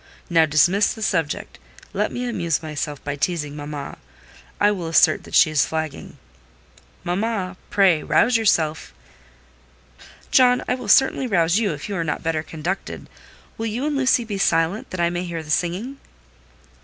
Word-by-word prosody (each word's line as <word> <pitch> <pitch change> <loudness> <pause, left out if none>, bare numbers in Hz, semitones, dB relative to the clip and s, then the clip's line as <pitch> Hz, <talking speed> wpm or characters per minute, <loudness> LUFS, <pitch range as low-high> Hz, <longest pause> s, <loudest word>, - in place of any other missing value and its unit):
Now 165 -2 +4
dismiss 175 +7 +3
the 220 - -7
subject. 165 -8 -2 0.3
Let - - -1
me 245 0 -4
amuse 170 -9 -1
myself 150 -2 -5
by 145 0 -3
teasing 150 -1 -2
mamma: 145 -1 -7 0.6
I 205 0 +4
will 180 -5 -4
assert 160 -1 +3
that - - -6
she 155 - +6
is 145 -3 +2
flagging. 160 -2 -5 0.9
Mamma, 190 +1 -2
pray 190 -6 +3
rouse 240 +9 +2
yourself." 165 -9 +1 1.4
"John, 250 -1 +4
I - - +1
will 250 -3 -6
certainly 265 +4 +4
rouse 175 -2 +2
you 215 -5 0
if 145 - -7
you 205 - -4
are 165 - -1
not 150 -2 -3
better 160 -1 -1
conducted. 165 +5 -5 0.5
Will 225 - -2
you 235 +6 -3
and 300 -1 -1
Lucy 260 -3 +2
be 205 -3 -5
silent, 165 +3 +1
that 185 - -6
I 170 0 +2
may 175 +1 -3
hear 170 -2 -5
the 150 - -7
singing?" 190 - -2
175 Hz, 165 wpm, -22 LUFS, 155-215 Hz, 1.4 s, she